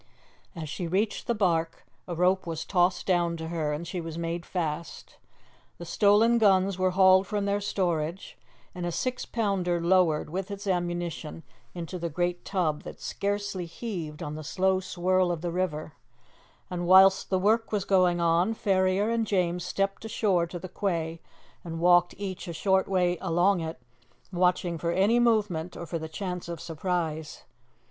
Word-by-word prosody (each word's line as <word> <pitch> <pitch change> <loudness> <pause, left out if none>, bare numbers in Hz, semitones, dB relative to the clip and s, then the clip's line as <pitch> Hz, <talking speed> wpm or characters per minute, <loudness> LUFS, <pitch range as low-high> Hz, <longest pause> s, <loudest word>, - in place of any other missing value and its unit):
As 160 -2 -5
she 170 +4 -4
reached 200 +5 -1
the 235 - +1
barque 165 -5 0 0.2
a 175 - -4
rope 180 +1 +2
was 165 -1 -4
tossed 180 -1 +1
down 175 -2 +1
to 160 0 -6
her, 160 -3 -1
and 150 +3 -4
she 180 0 -4
was 165 -1 -6
made 170 +1 -4
fast. 165 -3 -4 0.6
The 170 - -8
stolen 210 +6 +4
guns 195 -3 +3
were 185 0 +3
hauled 190 0 +5
from 205 -1 -1
their 200 0 0
storage, 175 -3 -2 0.4
and 180 - -6
a 175 - -1
six 255 +8 -3
pounder 195 -6 0
lowered, 170 -3 +2
with 190 +2 -3
its 200 +1 -6
ammunition, 175 -3 -3 0.3
into 175 +1 -5
the 170 0 -3
great 175 +2 -2
tub 165 -6 -1
that - - -10
scarcely 200 -3 -3
heaved 165 -6 -6
on 150 - -5
the 155 0 -6
slow 190 +4 +1
swirl 185 0 +1
of 170 -2 -3
the 175 0 -2
river; 160 -4 -2 0.7
and 175 -1 -4
whilst 190 +1 +6
the 190 - +2
work 220 +4 +2
was 205 -3 -1
going 180 -3 +3
on, 170 +6 +2
Ferrier 190 +1 +1
and 230 -1 0
James 180 -3 0
stepped 195 +3 -2
ashore 200 -6 +1
to 175 - -6
the 185 - -7
quay, 165 -4 -2 0.4
and 165 -1 -6
walked 175 0 +4
each 190 -2 -5
a 170 - -4
short 190 +2 +2
way 180 -2 +1
along 175 +3 +2
it, 160 -3 -5 0.5
watching 180 -1 +1
for 170 - -1
any 200 +7 +3
movement 210 -8 +1
or 170 - -6
for 165 0 -4
the 160 0 -6
chance 180 0 -5
of 170 -2 -5
surprise. 160 -2 -3
180 Hz, 170 wpm, -27 LUFS, 170-195 Hz, 0.7 s, whilst